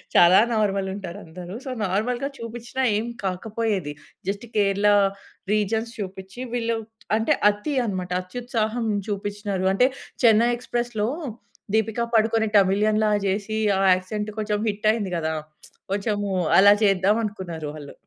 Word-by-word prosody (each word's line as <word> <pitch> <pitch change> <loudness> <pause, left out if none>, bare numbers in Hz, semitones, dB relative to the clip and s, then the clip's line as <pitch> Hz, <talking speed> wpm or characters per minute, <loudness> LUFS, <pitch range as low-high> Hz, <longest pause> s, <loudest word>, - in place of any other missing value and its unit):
చాలా 175 +2 +8
నార్మల్ 200 -3 +1
ఉంటారు 190 -4 -7
అందరు. 175 +3 -9
సో - - -4 0.2
నార్మల్‌గా 240 +8 -1
చూపించిన 235 +2 -7 0.2
ఏమి 230 +3 -3
కాకపోయేది, 195 -3 -2 0.4
జస్ట్ 200 +3 -3
కేరళ 200 0 +2 0.7
రీజన్స్ 220 +2 0
చూపించి 190 +2 -7
వీళ్ళు 230 -1 0 0.4
అంటే 225 - +2 0.2
అతి 210 +8 -2
అన్నమాట. 185 -4 -3
అత్యుత్సాహం 230 +3 -2 0.2
చూపించినారు. 205 -1 -3
అంటే 250 +6 +4 0.4
'చెన్నై 230 0 +6
ఎక్స్‌ప్రెస్‌'లో 240 -3 -2 0.7
దీపిక 220 +1 0 0.2
పడుకొనె 220 0 +3
తమిళియన్‌లాగా 210 +2 +2
చేసి 200 +3 -1 0.2
ఆ - - +1
యాక్సెంట్ 210 +3 -4
కొంచెం 210 -1 -1
హిట్ 210 +1 -2
అయింది 205 -5 -3
కదా! 160 -1 -1 0.6
కొంచెం 205 +1 0 0.4
అలా 205 +1 +8
చేద్దాం 195 +1 +3
అనుకున్నారు 175 -7 -5
వాళ్ళు. 145 -2 -9
210 Hz, 125 wpm, -24 LUFS, 190-225 Hz, 0.7 s, చాలా